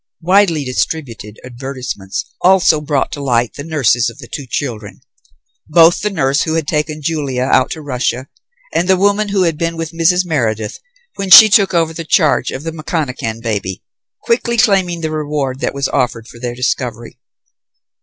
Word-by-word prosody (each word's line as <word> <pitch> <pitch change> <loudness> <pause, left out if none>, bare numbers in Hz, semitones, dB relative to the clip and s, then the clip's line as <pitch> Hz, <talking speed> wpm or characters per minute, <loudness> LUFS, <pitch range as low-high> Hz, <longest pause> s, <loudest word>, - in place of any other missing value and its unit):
Widely 175 -3 +3
distributed 115 -3 -4
advertisements 130 -6 -6 0.2
also 180 -4 +4
brought 145 -2 -1
to 145 - -6
light 120 -3 0
the 145 - -8
nurses 130 -7 +1
of 115 - -13
the 130 -5 -11
two 140 +1 -7
children; 115 -7 -5 0.7
both 165 +2 +5
the 210 - 0
nurse 140 -7 0
who 160 - -1
had 165 -2 -1
taken 150 0 -2
Julia 140 -5 -2
out 130 -1 +2
to 155 - -6
Russia 130 -1 -2 0.5
and 175 - 0
the 190 -1 +4
woman 205 +2 +1
who 195 -2 +1
had 165 -3 -1
been 165 -1 -2
with 165 -1 -4
Mrs. 175 +2 +2
Meredith 110 -10 -2 0.4
when 195 -1 -3
she 215 +3 +11
took 200 -3 +3
over 165 -1 +1
the 165 - -6
charge 155 -5 +2
of 135 - -6
the 165 - -4
McConachan 140 -8 -4
baby, 100 -5 -3 0.4
quickly 235 0 0
claiming 190 -7 +2
the 160 -1 -3
reward 145 -4 -3
that - - -3
was 140 -1 -1
offered 120 -4 -1
for 115 - -14
their 120 0 -4
discovery. 120 -1 -3
150 Hz, 175 wpm, -16 LUFS, 125-165 Hz, 0.7 s, she